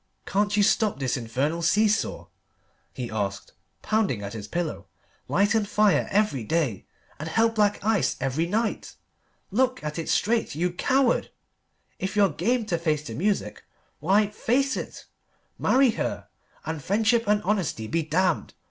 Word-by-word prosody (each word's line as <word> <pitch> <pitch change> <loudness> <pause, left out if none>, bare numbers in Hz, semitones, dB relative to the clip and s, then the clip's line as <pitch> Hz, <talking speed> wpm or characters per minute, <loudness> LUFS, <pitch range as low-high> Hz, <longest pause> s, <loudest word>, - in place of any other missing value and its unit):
"Can't 205 +1 0
you 205 - +5
stop 215 -2 +2
this 130 -3 -1
infernal 135 +7 -2
see 205 +6 +3
saw?" 210 - -1 0.7
he 120 -3 -6
asked, 100 -2 -3 0.3
pounding 205 - 0
at 100 - -6
his 105 -2 -7
pillow; 170 +4 -3 0.4
"light 205 +3 +2
and 220 -2 +1
fire 210 -2 +3
every 200 - +1
day, 140 - -1 0.3
and 155 +2 -5
hell 225 +7 +3
black 210 -2 +2
ice 220 -3 +2
every 140 +6 -1
night. 220 +4 -2 0.6
Look 255 +2 +1
at 150 +2 -4
it 165 - -4
straight, 225 -6 +1
you 175 +3 0
coward! 260 +6 +2 0.7
If 190 +2 -3
you're 200 -2 +4
game 225 - 0
to 175 -6 -1
face 155 -3 0
the 115 - -6
music, 195 - -1 0.4
why, 200 +6 +2
face 270 +6 +1
it! - - -7 0.5
Marry 260 -1 +4
her, - - -4 0.4
and 160 -2 -4
friendship 225 - +2
and 210 0 +2
honesty 190 - -1
be 165 +9 0
damned! 165 +3 0
195 Hz, 155 wpm, -25 LUFS, 150-215 Hz, 0.7 s, you